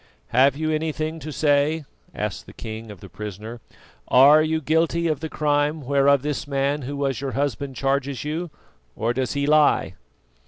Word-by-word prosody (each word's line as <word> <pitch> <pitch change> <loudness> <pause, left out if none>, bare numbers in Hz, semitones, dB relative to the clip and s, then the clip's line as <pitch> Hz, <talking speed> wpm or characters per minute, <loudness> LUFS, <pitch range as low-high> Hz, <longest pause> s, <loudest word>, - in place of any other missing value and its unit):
"Have 135 +3 +4
you 155 0 -1
anything 155 +1 -2
to 155 +1 -7
say?" 145 +1 +1 0.3
asked - - -4
the - - -12
king 110 0 -7
of 100 -4 -11
the - - -10
prisoner. 105 +3 -8 0.5
"Are 140 +4 +7
you 160 0 0
guilty 165 +3 +1
of 155 -4 0
the 160 +1 -5
crime 150 +1 0
whereof 140 0 +3
this 145 -1 -3
man 140 +1 0
who 140 +2 -5
was 135 -2 -1
your 135 -2 -3
husband 140 -1 -2
charges 135 0 -1
you, 160 +4 -3 0.5
or 115 +2 -1
does 130 -1 -2
he 140 0 -1
lie?" 150 0 +3
140 Hz, 170 wpm, -23 LUFS, 135-155 Hz, 0.5 s, Are